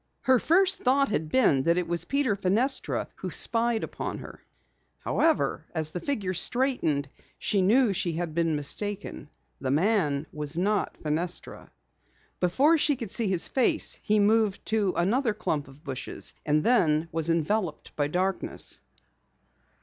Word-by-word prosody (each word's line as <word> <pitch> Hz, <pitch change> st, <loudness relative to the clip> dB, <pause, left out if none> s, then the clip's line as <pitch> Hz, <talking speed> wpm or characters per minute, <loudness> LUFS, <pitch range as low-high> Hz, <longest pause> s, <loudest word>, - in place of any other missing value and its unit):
Her 260 Hz, -2 st, +3 dB
first 375 Hz, +7 st, +3 dB
thought 275 Hz, +2 st, +2 dB
had 155 Hz, -6 st, -2 dB
been 155 Hz, -, +3 dB
that 170 Hz, +5 st, +2 dB
it 180 Hz, -1 st, -1 dB
was 170 Hz, 0 st, -2 dB
Peter 275 Hz, -4 st, 0 dB
Fenestra 210 Hz, +8 st, 0 dB
who -, -, -5 dB
spied 230 Hz, -1 st, 0 dB
upon -, -, -5 dB
her. -, -, -11 dB, 0.6 s
However, 325 Hz, -1 st, 0 dB
as 155 Hz, -1 st, +1 dB
the 180 Hz, -, -4 dB
figure 200 Hz, -6 st, -2 dB
straightened 180 Hz, -, +1 dB, 0.3 s
she 200 Hz, -, 0 dB
knew 220 Hz, +3 st, +3 dB
she 175 Hz, -2 st, -1 dB
had 165 Hz, -1 st, -3 dB
been 165 Hz, -1 st, +1 dB
mistaken. 195 Hz, +2 st, -4 dB, 0.3 s
The 135 Hz, -, -3 dB
man 155 Hz, -2 st, +1 dB
was 150 Hz, +1 st, -1 dB
not 205 Hz, +3 st, 0 dB
Fenestra. 165 Hz, +4 st, -3 dB, 0.7 s
Before 275 Hz, -, +3 dB
she 290 Hz, -1 st, +3 dB
could 230 Hz, -6 st, -7 dB
see 230 Hz, -3 st, +1 dB
his 185 Hz, -3 st, +2 dB
face, 260 Hz, -3 st, +1 dB
he 215 Hz, 0 st, +1 dB
moved 210 Hz, -1 st, +2 dB
to 210 Hz, -4 st, 0 dB
another 220 Hz, +6 st, +1 dB
clump 150 Hz, -9 st, -2 dB
of 135 Hz, +3 st, -17 dB
bushes, 130 Hz, -3 st, -2 dB
and 150 Hz, 0 st, +2 dB
then 165 Hz, -10 st, +2 dB
was 165 Hz, 0 st, -1 dB
enveloped 165 Hz, +1 st, -1 dB
by 145 Hz, -1 st, 0 dB
darkness. 185 Hz, +5 st, -3 dB
190 Hz, 150 wpm, -27 LUFS, 160-230 Hz, 0.7 s, Her